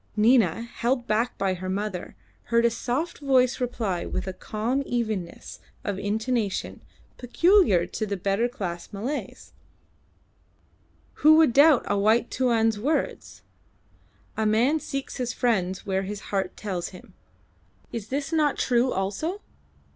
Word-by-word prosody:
Nina, 220 -3 +3
held 240 +1 -2
back 230 +3 0
by 195 -1 0
her 185 +1 -5
mother, 195 -1 -4 0.3
heard 235 0 +2
a 235 - +4
soft 260 +8 -3
voice 260 -2 +2
reply 220 -8 -2
with - - -4
a 190 - -4
calm 220 +8 -2
evenness 220 -9 -4 0.2
of 200 -1 -3
intonation 220 0 -2 0.4
peculiar 255 - +4
to 215 +4 -4
the 200 -1 -2
better 195 +5 +1
class 175 -8 -6
Malays 235 +9 -5 1.7
"Who 310 +1 +8
would 315 -6 +5
doubt 285 0 +6
a 205 - 0
white 220 +4 +2
Tuan's 225 -4 +1
words? 290 +8 -2 0.9
A 220 -1 0
man 240 +9 +3
seeks 275 -1 -5
his 250 -2 -2
friends 190 -6 0
where 190 -1 0
his 200 +1 -7
heart 190 -2 -1
tells 185 -5 -3
him. 195 +2 -14 0.8
Is 225 -3 -5
this 275 +5 -3
not 300 -3 +2
true 250 0 +2
also? 205 - -2
225 Hz, 135 wpm, -25 LUFS, 195-255 Hz, 1.7 s, Who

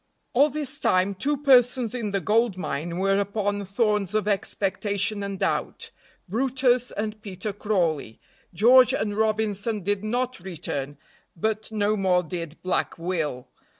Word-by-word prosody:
ALL 285 +5 +5
this 295 0 -5
time 185 -3 +2
two 285 +10 0
persons 250 -4 +4
in 235 -4 -2
the 200 0 0
gold 215 +2 +1
mine 170 -1 -3
were 195 +1 +2
upon 205 0 -1
thorns 210 0 0
of 215 -1 +1
expectation 205 +1 -1
and 200 -1 -4
doubt - - -2 0.4
brutus 250 +3 +1
and 215 0 -4
Peter 200 0 -4
Crawley. 170 - -1 0.3
George 250 +7 +6
and 205 -4 -2
Robinson 215 -1 0
did 205 +1 -1
not 245 +2 -1
return, 145 -6 -5 0.4
but 215 +5 -2
no 210 0 +1
more 185 -3 +2
did 165 -1 -6
Black 185 0 -1
Will. 165 -7 -3
205 Hz, 140 wpm, -25 LUFS, 185-230 Hz, 0.4 s, George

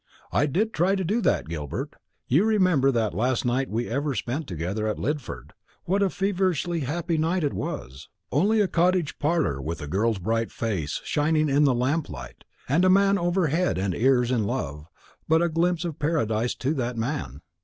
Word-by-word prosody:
I 145 - +2
did 210 +10 0
try 185 +5 +2
to 190 - -1
do 210 +7 0
that, 190 - +1
Gilbert. 75 -4 -5 0.3
You 150 +10 +4
remember 185 -11 +3
that 115 -4 0
last 125 +2 0
night 130 +2 0
we 115 +3 -2
ever 140 +3 -1
spent 135 +6 -3
together 95 +5 -3
at 105 - -1
Lidford 145 -2 -4 0.3
what 195 +3 0
a 200 - +3
feverishly 185 -4 0
happy 160 +3 -1
night 165 +3 +1
it 145 - 0
was; 65 +3 -6 0.2
only 205 - +3
a 200 - +2
cottage 180 -2 +1
parlour 150 - 0
with 80 +4 -4
a 75 - -5
girl's 105 +8 0
bright 115 +4 -1
face 95 -11 -3
shining 155 0 +1
in 145 +2 +4
the 135 -3 +3
lamplight, 140 +6 -3 0.2
and 150 +7 +2
a 185 - +5
man 200 +1 +4
over 175 -1 +1
head 175 - +1
and 95 0 -1
ears 125 +2 +2
in 115 -5 +1
love, 75 - -4 0.4
but 160 +2 +4
a 170 - +2
glimpse 170 +1 0
of 165 -4 -5
paradise 120 -7 0
to 135 +4 -1
that 125 -4 -2
man. 115 - -3
145 Hz, 185 wpm, -25 LUFS, 115-175 Hz, 0.4 s, a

